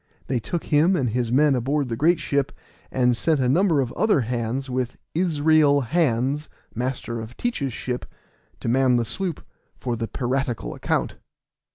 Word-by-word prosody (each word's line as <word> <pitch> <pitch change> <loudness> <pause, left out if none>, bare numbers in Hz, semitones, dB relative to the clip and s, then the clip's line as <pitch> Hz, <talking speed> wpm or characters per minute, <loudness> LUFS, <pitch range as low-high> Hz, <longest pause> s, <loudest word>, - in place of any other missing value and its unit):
They 130 -2 0
took 170 +8 -3
him 160 +5 +3
and 130 -8 0
his 120 0 -1
men 145 +3 +4
aboard 135 +3 0
the 115 - -2
great 165 +7 +3
ship, 140 -4 0 0.4
and 125 -1 +2
sent 155 +4 +1
a 130 - +2
number 165 +2 +3
of 125 -3 -3
other 215 -10 +2
hands 120 +3 -2
with 125 -1 -2 0.2
Israel 155 -4 +3
Hands, 140 +1 0 0.2
master 120 -1 -3
of 110 +2 -10
Teach's 155 - -1
ship, 125 +1 -4 0.5
to - - -4
man 130 +1 +3
the 120 -1 +1
sloop 180 - -4 0.3
for 120 -2 -2
the 115 0 -3
piratical 125 - -2
account. - - -1
130 Hz, 165 wpm, -24 LUFS, 120-150 Hz, 0.5 s, men